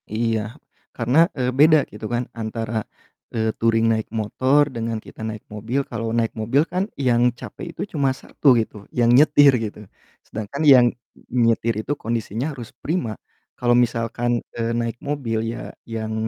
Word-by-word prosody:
Iya 115 -1 +1 0.6
karna, 120 +5 0 0.2
eee, 125 -1 +1
beda 155 +1 +7
gitu 110 - -8
kan 120 +1 +1 0.2
antara, 115 +1 -4 0.6
eee, 110 -1 0
touring 115 0 +3
naik 110 -1 -1
motor 130 +7 +3
dengan 115 -1 -2
kita - - -12
naik 110 -1 -6
mobil, 115 +6 -2
kalau 115 +1 -3
naik 115 -1 0
mobil 115 +6 +2
kan 185 +2 0 0.2
yang 120 -1 +3 0.2
capek - - -8
itu - - -7
cuma 140 -4 +2
1 145 - -3
gitu 110 - -3 0.2
yang 120 - +4
nyetir 145 0 +7
gitu, 105 - -5 0.5
sedangkan 110 +7 -5
yang 125 -2 +7 0.6
nyetir 115 0 +2
itu - - -3
kondisinya 115 +1 -2
harus 120 -5 -8
prima, 135 - -1 0.4
kalau 120 -1 +2
misalkan, 120 +1 -1 0.2
eee, 115 0 -1
naik 115 0 -2
mobil 140 -6 -2 0.2
ya 120 - -7 0.2
yang 110 0 -3
115 Hz, 155 wpm, -22 LUFS, 110-130 Hz, 0.6 s, beda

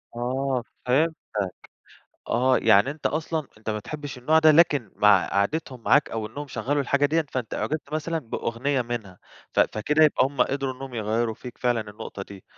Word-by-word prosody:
آه، 130 +1 -1 0.2
فهمتك. 125 - 0 0.8
آه، 125 +2 +3
يعني 100 +8 +4
أنت 150 -1 -14
أصلًا 155 +2 -1
أنت 110 0 -6
ما 105 - -1
بتحبش 145 +5 -7
النوع 155 +6 +3
ده، 155 -1 +7
لكن 150 -7 +3
مع - - +5
قعدتهم 125 +4 -1
معاك 145 - +4
أو 110 -1 -3
إنّهم 145 +7 -7
شغلوا 140 +4 -1
الحاجة 140 +2 +2
ديّة، 160 +2 +1
فأنت 125 -4 -3
أُعجبت 150 -1 -3
مثلًا 160 +2 -1
بأغنية 125 +1 -2
منها 115 -6 -6 0.3
ف - - +1
فكده 150 +9 +3
يبقى 150 -4 +4
همّ 135 0 -1
قدروا 135 -1 0
إنّهم 130 0 -9
يغيروا 110 +1 -1
فيك 125 +2 -10
فعلًا 120 -2 +1
النقطة 105 -1 -8
دي، 95 -1 -12
130 Hz, 170 wpm, -25 LUFS, 115-145 Hz, 0.8 s, ده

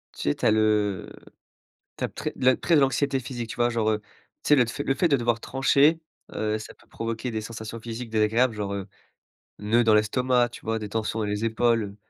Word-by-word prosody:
Tu - - -2
sais, 70 - +1
tu - - -4
as - - +5
le 105 -3 +1 0.9
t'as - - -2
très - - -5
le 130 0 +3
trait, 170 - +2
de - - +6
l'anxiété 135 0 +1
physique, 120 -2 -6
tu - - -6
vois, 120 0 +2
genre, 115 -2 0
heu, 105 -1 0 0.4
tu - - -5
sais, 150 - +6
le 125 - +5
tf 115 - -7
le 135 - +1
fait 170 +6 +2
de 140 - +4
devoir 120 -2 0
trancher, 140 +5 +3 0.3
heu, 110 0 -1
ça 110 - -10
peut - - -25
provoquer 115 +2 -4
des 110 - -3
sensations 110 +1 -7
physiques 115 +1 -6
désagréables, 110 +3 +2
genre, 100 -1 -3
heu, 100 -1 -4 0.7
nœuds 110 +3 +2
dans 110 - +5
l'estomac, 120 +3 +2
tu 120 - -13
vois, 115 0 0
des 105 -1 -6
tensions 110 +1 -2
dans 110 - -1
les 105 +2 -2
épaules, 115 -3 +1
115 Hz, 225 wpm, -25 LUFS, 110-125 Hz, 0.9 s, de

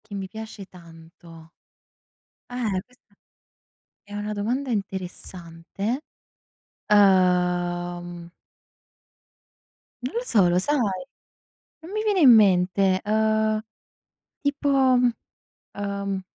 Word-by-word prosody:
che 220 -2 -12
mi 195 -1 -5
piace 220 0 -9
tanto. 165 -1 -15 1.0
Eh, 220 -7 -2
questa 250 -4 -30 0.9
è 205 - -16
una 210 +1 -4
domanda 245 +7 -2
interessante, 190 - -5 0.9
uhm 175 -3 +2 1.7
non 255 - -5
lo 475 - 0
so, 205 - +3
lo 175 +1 +2
sai? 290 +10 +1 1.0
Non 325 +3 -12
mi 430 +1 -2
viene 415 -3 +1
in 285 -6 +7
mente, 190 -2 +4
uhm, 215 0 +1 0.8
tipo, 285 0 -1 1.1
uhm 200 -1 -3
200 Hz, 90 wpm, -24 LUFS, 180-220 Hz, 1.7 s, in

